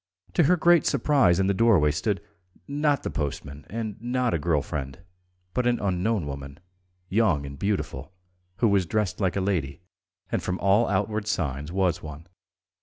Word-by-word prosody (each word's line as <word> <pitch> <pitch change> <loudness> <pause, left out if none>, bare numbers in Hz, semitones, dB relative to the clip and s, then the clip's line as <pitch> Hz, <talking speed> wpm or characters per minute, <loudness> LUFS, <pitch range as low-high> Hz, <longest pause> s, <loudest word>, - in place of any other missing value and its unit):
To 170 - +4
her 180 +5 +4
great 175 0 +4
surprise 120 - +3
in 95 - +2
the 100 - +2
doorway 95 -9 +4
stood, 100 +6 -1 0.5
not 145 0 +1
the - - -3
postman 75 -1 -5
and 110 -1 -5
not 125 0 0
a 85 - +1
girl 75 -2 +1
friend, 70 -3 -5 0.6
but 125 -1 +1
an 120 0 +2
unknown 100 0 0
woman, 70 +1 -7 0.5
young 95 -8 +2
and 70 0 -9
beautiful, 100 -5 -2 0.4
who 115 - +2
was 100 -4 +2
dressed 105 0 -1
like 95 -2 +1
a 100 - 0
lady, 85 -9 -1 0.5
and - - 0
from 90 0 -2
all 100 +5 +3
outward 105 +2 -1
signs 75 -7 -2
was 90 -3 +1
one. 75 +1 -9
95 Hz, 170 wpm, -26 LUFS, 75-115 Hz, 0.6 s, To